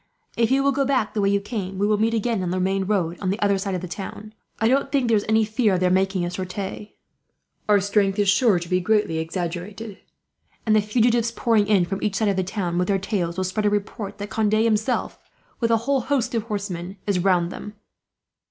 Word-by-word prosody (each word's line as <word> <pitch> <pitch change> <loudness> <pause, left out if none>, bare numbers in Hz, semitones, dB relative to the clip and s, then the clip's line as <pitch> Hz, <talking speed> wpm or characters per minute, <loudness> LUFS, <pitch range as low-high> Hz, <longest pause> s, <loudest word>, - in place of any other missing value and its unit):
"If 230 -1 +2
you 270 +1 +3
will 280 - +3
go 275 0 +1
back 260 -6 0
the 210 - 0
way 200 - +3
you 200 0 +2
came, 200 -2 -5
we 200 - +1
will 210 0 +2
meet 225 +1 +2
again 225 -2 0
on 180 - -2
the 185 +1 -1
main 190 +1 0
road, 180 -4 -1
on 190 - -1
the 200 +4 -1
other 200 -1 +2
side 195 -1 -2
of 180 - -3
the 180 - -5
town. 210 +4 -7 0.3
I 225 - +3
don't 275 +2 +1
think 270 -4 +1
there 230 - +3
is 205 - 0
any 220 0 +4
fear 215 -2 +1
of - - 0
their 180 0 +2
making 190 -1 +1
a 175 - -3
sortie. 190 +3 -6 0.7
Our 205 -1 +6
strength 200 0 +1
is 205 -1 +2
sure 205 0 +4
to 170 0 -5
be 180 +1 +1
greatly 195 -4 +1
exaggerated; 180 +5 -5 0.7
and 215 -1 +3
the 215 - +5
fugitives, 230 +2 +2
pouring 230 -3 +1
in 195 -4 +3
from 195 +2 -4
each 210 -2 -1
side 215 +1 +1
of 200 - +1
the 190 - 0
town 180 -3 -2
with 180 - 0
their 200 - +2
tales, 190 -3 -2
will 190 - 0
spread 200 +3 -1
a - - +4
report 205 0 -3
that 205 -1 -7
Conde 215 0 +1
himself, 220 +2 +1 0.4
with 230 - +1
a 230 - +4
whole 275 -1 +2
host 250 -1 -1
of 230 - +1
horsemen, 200 -4 -5
is 200 -3 +1
around 175 -2 +2
them." 210 +3 -8
205 Hz, 240 wpm, -23 LUFS, 185-220 Hz, 0.7 s, Our